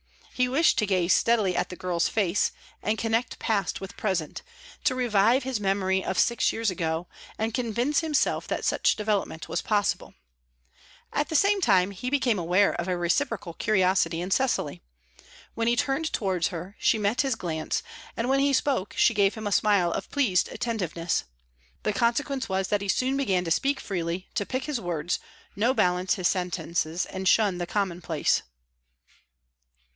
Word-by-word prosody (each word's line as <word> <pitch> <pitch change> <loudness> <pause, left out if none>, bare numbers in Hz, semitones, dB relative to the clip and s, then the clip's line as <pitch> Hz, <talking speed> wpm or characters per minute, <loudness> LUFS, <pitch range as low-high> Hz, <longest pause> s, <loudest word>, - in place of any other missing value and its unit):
He 250 0 +1
wished 275 +1 +3
to 215 - +1
gaze 185 -2 +2
steadily 215 -6 +2
at - - 0
the 180 - -7
girl's 175 -2 0
face, 205 -3 +1 0.3
and 215 +1 0
connect 225 +2 -1
past 200 -5 -1
with 195 0 -8
present; 185 -7 -2 0.4
to 255 - +2
revive 240 +1 +3
his 260 -4 -2
memory 190 -1 +1
of 190 - -3
six 235 -1 +3
years 225 -3 -1
ago, 165 0 -2 0.3
and 220 +1 -2
convince 245 +4 0
himself 315 -3 0
that - - -2
such - - +2
development 205 -6 -2
was 170 - -2
possible. 205 -3 -1 1.0
At 295 - 0
the 320 - -3
same 395 +4 +3
time 195 - +3
he 200 +6 -4
became 255 -7 +1
aware 180 +4 +3
of 175 - -3
a 180 -1 0
reciprocal 180 +1 -1
curiosity 185 -4 +2
in 180 +2 -4
Cecily. 250 - 0 0.7
When 230 0 -1
he 235 - +3
turned 290 +5 0
towards 185 -5 0
her 180 +2 -7
she - - +3
met 210 +4 +1
his 265 -3 0
glance, 160 -6 -3 0.3
and 230 - -1
when 270 +1 +3
he 280 0 +2
spoke 260 -7 0
she 235 - +4
gave 200 -2 +2
him 220 -1 -7
a 205 - -1
smile 200 -4 +3
of - - -4
pleased 230 -12 +1
attentiveness. 180 -7 -2 0.6
The 210 - 0
consequence 260 +4 0
was 190 0 -1
that 205 -1 +1
he 200 - -4
soon 255 +7 +1
began 195 -10 +1
to 165 - -4
speak 275 - +1
freely, 175 -1 -3
to 205 - -2
pick 260 +5 -2
his 280 -5 -3
words, 175 -1 -2 0.4
no 235 +6 +2
balance 180 -2 +2
his 185 -3 +1
sentences 175 -2 -1
and 190 0 -4
shun 200 -3 +3
the 175 - -3
commonplace. 175 -5 0
200 Hz, 170 wpm, -26 LUFS, 180-240 Hz, 1.0 s, she